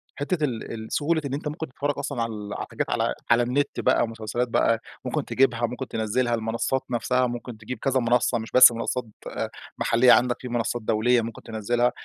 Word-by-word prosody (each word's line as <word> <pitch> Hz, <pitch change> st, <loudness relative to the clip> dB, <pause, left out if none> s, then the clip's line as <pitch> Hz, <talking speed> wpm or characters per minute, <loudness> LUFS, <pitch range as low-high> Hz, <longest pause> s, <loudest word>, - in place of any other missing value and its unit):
حتّة 155 Hz, +3 st, -2 dB
ال 125 Hz, -6 st, -2 dB
ال 110 Hz, -1 st, -6 dB
سهولة 160 Hz, +2 st, +1 dB
إن 135 Hz, -, -3 dB
أنت 145 Hz, +2 st, -3 dB
ممكن 155 Hz, +2 st, -4 dB
تتفرّج 145 Hz, +3 st, -2 dB
أصلًا 140 Hz, -3 st, -3 dB
على 105 Hz, -3 st, -4 dB
حاجات -, -, -3 dB
على -, -, +1 dB, 0.2 s
على 120 Hz, +1 st, +5 dB
النت 130 Hz, +4 st, -1 dB
بقى -, -, +3 dB
مسلسلات 115 Hz, +2 st, -3 dB
بقى 115 Hz, -1 st, +2 dB, 0.3 s
ممكن -, -, -2 dB
تجيبها 125 Hz, -3 st, +2 dB
ممكن 125 Hz, +2 st, -6 dB
تنزلها، 120 Hz, +2 st, 0 dB
المنصات 115 Hz, +4 st, -1 dB
نفسها 125 Hz, +1 st, +1 dB
ممكن 120 Hz, -1 st, -6 dB
تجيب 110 Hz, +3 st, -6 dB
كذا 135 Hz, +1 st, +1 dB
منصّة 120 Hz, 0 st, +2 dB
مش 110 Hz, 0 st, -7 dB
بس 125 Hz, -1 st, +10 dB
منصات 120 Hz, +2 st, -2 dB, 0.7 s
محلية 125 Hz, +2 st, +5 dB
عندك، 125 Hz, 0 st, +4 dB
في 125 Hz, -, -6 dB
منصات 120 Hz, 0 st, -1 dB
دولية 115 Hz, +3 st, +2 dB
ممكن 115 Hz, 0 st, -7 dB
تنزلها، 120 Hz, +2 st, 0 dB
120 Hz, 185 wpm, -25 LUFS, 115-130 Hz, 0.7 s, بس